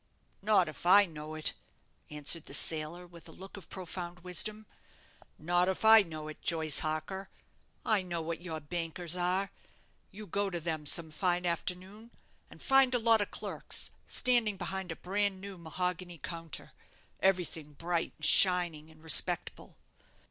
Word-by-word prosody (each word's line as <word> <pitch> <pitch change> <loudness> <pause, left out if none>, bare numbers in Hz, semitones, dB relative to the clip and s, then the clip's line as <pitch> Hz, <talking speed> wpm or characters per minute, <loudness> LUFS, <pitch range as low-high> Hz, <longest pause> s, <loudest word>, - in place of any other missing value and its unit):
"Not 200 -4 +3
if 155 - -9
I 200 +3 +7
know 155 -2 -9
it," 155 - -2 0.6
answered 150 +2 0
the 140 - -1
sailor, 160 +4 +1
with 170 -1 -13
a - - -10
look 190 +1 -11
of 200 - -11
profound 180 -1 -7
wisdom; 210 +4 0 0.7
"not 175 +3 +1
if 190 +3 -2
I 220 0 +9
know 155 -4 -7
it, 155 - -10
Joyce 160 -3 +3
Harker. 155 +5 -4 0.6
I 215 -3 +2
know 175 -2 -4
what 165 +1 -5
your 165 -3 -6
bankers 165 +2 -1
are. 185 +2 -1 0.6
You 210 +2 -10
go 200 +2 -2
to 175 -2 -4
them 160 -2 -4
some 160 +1 +5
fine 180 +2 0
afternoon, 185 +5 -4 0.4
and - - -14
find 270 -2 +4
a - - +4
lot 225 -2 +3
of 205 - -3
clerks - - -4 0.2
standing 235 -5 +1
behind 190 -1 -4
a - - -5
bran 195 +2 -2
new 200 0 -9
mahogany 180 +1 -4
counter, 165 +2 -7 0.5
everything 175 -5 -1
bright, 170 +3 -3
and 155 - -1
shining, 170 -2 +5
and 155 0 -19
respectable. 160 -2 +2
175 Hz, 155 wpm, -31 LUFS, 160-195 Hz, 0.7 s, I